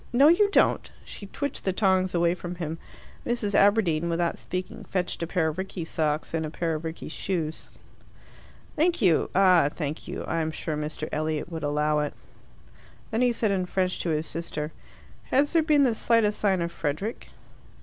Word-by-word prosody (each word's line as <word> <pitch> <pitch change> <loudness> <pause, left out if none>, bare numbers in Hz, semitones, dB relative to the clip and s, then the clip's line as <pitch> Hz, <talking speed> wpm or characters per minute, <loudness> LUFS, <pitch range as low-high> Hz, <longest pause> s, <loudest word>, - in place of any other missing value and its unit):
No, 275 +5 +6
you 405 +5 +5
don't!" - - +3 0.2
She 200 - -9
twitched 285 +7 -4
the 190 - +1
tongs 185 -1 +2
away 170 0 +3
from 180 0 -6
him. 165 -1 -4 0.4
Mrs. 235 -4 -1
Aberdeen, 185 -6 +3
without 170 0 0
speaking, 185 0 -5
fetched 180 -2 -2
a 170 - -1
pair 170 -2 +1
of 155 +4 -6
Rickie's 185 -3 -5
socks 155 -1 -1
and 160 -1 0
a 155 - -3
pair 165 +1 -2
of 155 +1 -4
Rickie's 160 -1 -6
shoes. 165 -3 -3 1.1
"Thank 340 +3 +2
you; 175 -5 +3
ah, 180 -6 +5
thank 150 0 -5
you. - - -5
I 165 - -1
am 160 - -1
sure 155 0 -4
Mr. 150 +1 -4
Elliot 155 +1 -2
would 165 -1 -4
allow 150 +1 +1
it." 150 -1 -2 1.0
Then 225 +2 0
he 250 -1 +4
said 225 -3 0
in 185 -2 0
French 185 0 0
to 175 - -2
his 155 0 0
sister, 160 -2 -4 0.5
"Has 285 +4 +2
there 330 - +5
been 305 -2 +4
the 250 -4 +3
slightest 220 -2 +2
sign 190 -4 +2
of 170 - -3
Frederick?" 165 +7 -3
175 Hz, 185 wpm, -26 LUFS, 160-205 Hz, 1.1 s, No